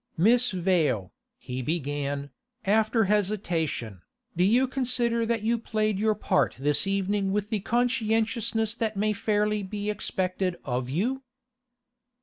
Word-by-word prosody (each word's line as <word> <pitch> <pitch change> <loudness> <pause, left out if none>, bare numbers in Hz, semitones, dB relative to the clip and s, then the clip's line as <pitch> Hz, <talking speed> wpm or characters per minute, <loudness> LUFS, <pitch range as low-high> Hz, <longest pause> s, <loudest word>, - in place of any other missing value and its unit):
'Miss 235 +8 +4
Vale,' 170 - 0 0.2
he 125 +1 -5
began, 145 -1 -3 0.3
after 220 +3 +3
hesitation, 175 - -1 0.3
'do 175 - +2
you 240 +7 +4
consider 240 -3 0
that 230 -2 0
you 230 +1 +1
played 215 -3 -1
your 215 0 +2
part 140 - +1
this 145 +7 +2
evening 195 0 0
with 210 +2 -2
the 215 - +1
conscientiousness 225 -1 +1
that 220 -3 -2
may 210 +1 +1
fairly 210 0 0
be 205 +2 -3
expected 185 -3 -2
of 125 -1 -2
you? 235 - -1
205 Hz, 130 wpm, -27 LUFS, 175-225 Hz, 0.3 s, Miss